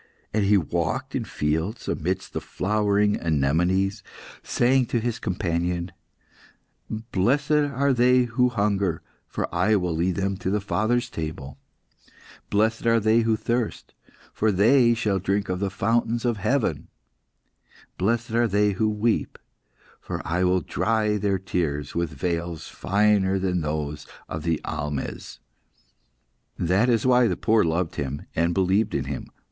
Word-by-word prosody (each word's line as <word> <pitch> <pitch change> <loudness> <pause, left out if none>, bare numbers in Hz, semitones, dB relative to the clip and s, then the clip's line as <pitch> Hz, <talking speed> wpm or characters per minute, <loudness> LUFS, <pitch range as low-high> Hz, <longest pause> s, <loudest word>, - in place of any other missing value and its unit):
And 105 -1 +2
He 105 +1 +5
walked 95 - -2
in 120 - -2
fields, 80 +9 -2
amidst 90 +3 -2
the - - -3
flowering 105 +1 +1
anemones, 90 +7 +1 0.4
saying 125 0 +2
to 120 - 0
His 115 0 -2
companion 85 -2 -2 1.0
"'Blessed 115 +6 0
are 140 -2 +2
they 125 +1 +4
who 125 +1 +1
hunger, 100 -6 0 0.2
for - - -3
I 90 +5 +3
will 90 -4 0
lead 85 +2 0
them 95 0 -1
to 95 - -3
My 105 - +1
Father's 110 +4 0
table! 75 -4 -6 0.9
Blessed 110 +3 +1
are 115 0 +4
they 110 +2 +3
who 115 -1 +2
thirst, 120 0 -3 0.4
for 110 0 +1
they 115 +5 +4
shall 105 -4 0
drink 100 +2 -1
of 90 0 -1
the 100 0 -1
fountains 115 +4 0
of 120 -3 +1
heaven! 125 +6 0 1.1
Blessed 115 +4 0
are 120 +1 +2
they 105 0 +2
who 110 +3 0
weep, 105 +2 0 0.6
for - - -5
I 85 +3 0
will 90 0 +2
dry 105 +5 0
their 100 -1 0
tears 80 -6 -2
with 85 -1 -1
veils 85 +2 -3
finer 100 -1 +2
than 90 -2 0
those 75 -1 -3 0.2
of 80 - -5
the 80 0 0
almehs!' 75 -3 -4 1.2
"That 95 +8 +2
is 115 -1 +2
why 125 -1 +5
the - - -1
poor 110 -1 +3
loved 80 +1 -1
Him, 70 0 -3
and 85 +1 +1
believed 95 +3 +1
in 70 - 0
Him. 70 0 -5
100 Hz, 145 wpm, -24 LUFS, 85-115 Hz, 1.2 s, He